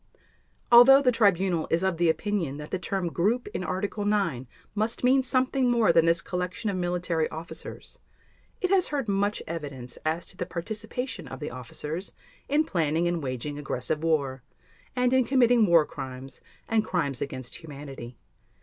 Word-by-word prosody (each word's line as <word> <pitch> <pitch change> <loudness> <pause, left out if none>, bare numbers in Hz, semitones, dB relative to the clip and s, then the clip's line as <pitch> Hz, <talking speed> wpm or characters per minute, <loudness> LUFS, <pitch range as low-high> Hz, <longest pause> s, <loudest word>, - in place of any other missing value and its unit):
Although 265 +4 +9
the 250 - +5
Tribunal 190 -7 +2
is 170 +3 +1
of 190 -3 +1
the 170 0 +3
opinion 170 -5 -1
that 150 0 -8
the 185 - -1
term 180 0 -2
"group" 215 +9 0
in - - -4
Article 200 +3 -2
9 190 -12 0 0.3
must 215 +3 -1
mean 260 +2 +5
something 255 0 +1
more 230 -7 +4
than 165 0 +5
this 170 0 +3
collection 185 +5 -3
of - - -3
military 175 -2 -1
officers, 165 +2 -9 0.6
it 370 - 0
has 380 -2 +4
heard 280 -5 -2
much 200 +1 0
evidence 140 -7 -6
as 160 +2 -1
to - - -10
the - - -3
participation 220 - -5
of 130 +1 -8
the 150 - -5
officers 150 - -6 0.4
in 295 +3 +3
planning 165 - 0
and 175 -1 -1
waging 140 +2 -4
aggressive 145 +2 -3
war, 140 -5 0 0.5
and 250 0 +2
in 260 0 +5
committing 245 -3 +4
War 170 -3 +5
Crimes 130 -1 -8 0.3
and 225 -1 +2
Crimes 150 - -1
against 130 -3 -5
Humanity. 140 -6 -9
175 Hz, 165 wpm, -27 LUFS, 150-220 Hz, 0.6 s, Although